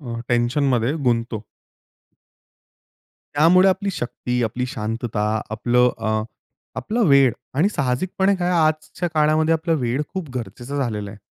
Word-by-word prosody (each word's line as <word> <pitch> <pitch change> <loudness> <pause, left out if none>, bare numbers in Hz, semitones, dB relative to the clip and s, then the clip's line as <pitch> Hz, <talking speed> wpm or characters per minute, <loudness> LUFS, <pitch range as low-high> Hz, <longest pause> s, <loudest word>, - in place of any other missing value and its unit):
अ, 115 -4 -6
टेन्शनमध्ये 120 +1 +1
गुंततो. 115 -3 0 1.9
त्यामुळे 180 +6 +5
आपली 195 +1 0
शक्ती, 125 -4 -3
आपली 125 +3 -2
शांतता, 110 -2 -3 0.3
आपलं 120 +3 +2
अ, 110 -1 0 0.5
आपला 230 +3 -2
वेळ 135 -4 +5 0.2
आणि 170 +7 +4
साहजिकपणे 185 +5 0
काय 175 0 -1 0.2
आजच्या 155 +3 -2
काळामध्ये 155 +1 +3
आपला 165 +1 0
वेळ 130 0 -1
खूप 185 -5 -4
गरजेचं 120 +4 -6
झालेलं 105 -7 -2
आहे. 105 - -12
130 Hz, 120 wpm, -22 LUFS, 115-155 Hz, 1.9 s, त्यामुळे